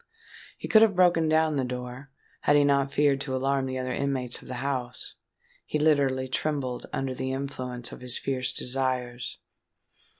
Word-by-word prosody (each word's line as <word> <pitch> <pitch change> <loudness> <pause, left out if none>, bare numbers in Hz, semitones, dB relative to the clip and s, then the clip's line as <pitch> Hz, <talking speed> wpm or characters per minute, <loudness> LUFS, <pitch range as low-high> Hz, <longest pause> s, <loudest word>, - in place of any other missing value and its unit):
He - - -6
could 220 - +6
have 220 -4 +5
broken 175 -3 +4
down 155 -1 +3
the 135 - +1
door, 125 +2 -6 0.3
had 145 - +3
he 145 - +6
not 140 -1 +2
feared 140 -1 +2
to 135 -2 -2
alarm 135 +1 0
the 130 0 -3
other 130 0 -2
inmates 130 -3 -1
of - - -14
the 130 - -5
house. 125 -1 -4 0.5
He - - -2
literally 140 -4 +2
trembled 130 -2 -2
under 135 -1 -2
the 130 +1 -3
influence 130 -3 -5
of - - -10
his 125 -1 +1
fierce 130 -2 -1
desires. 125 -2 -2
135 Hz, 170 wpm, -27 LUFS, 125-145 Hz, 0.5 s, could